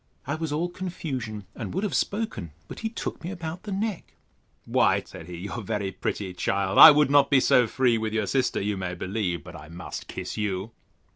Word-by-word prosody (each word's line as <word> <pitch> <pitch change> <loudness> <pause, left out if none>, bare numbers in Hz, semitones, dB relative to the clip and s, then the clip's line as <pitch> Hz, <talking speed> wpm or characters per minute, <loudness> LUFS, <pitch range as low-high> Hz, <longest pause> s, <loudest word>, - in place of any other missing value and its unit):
I 140 - -2
was 155 -1 -3
all 160 +4 0
confusion, 135 - -5
and - - -6
would 190 - -1
have 205 - -1
spoken: 200 - -2
but - - -8
he 225 - -2
took 225 - -5
me 170 - -4
about 175 -2 -6
the 210 - -7
neck: 200 0 -3 0.5
Why, - - +3
said 80 - -11
he, 90 -1 -7
you 95 +3 -6
are 120 - -4
very 105 -2 -2
pretty, 95 0 -3
child: 100 +1 0
I - - +14
would 150 -2 +4
not 140 -1 +5
be 140 - +5
so 125 -1 +4
free 120 -1 +2
with 110 -1 -2
your 110 -1 0
sister, 130 +4 +1
you 100 0 -1
may 90 -1 -3
believe; 90 -1 -2
but - - -11
I 75 +2 -11
must 85 +1 -7
kiss - - -6
you. 100 0 -2
115 Hz, 215 wpm, -26 LUFS, 95-160 Hz, 0.5 s, I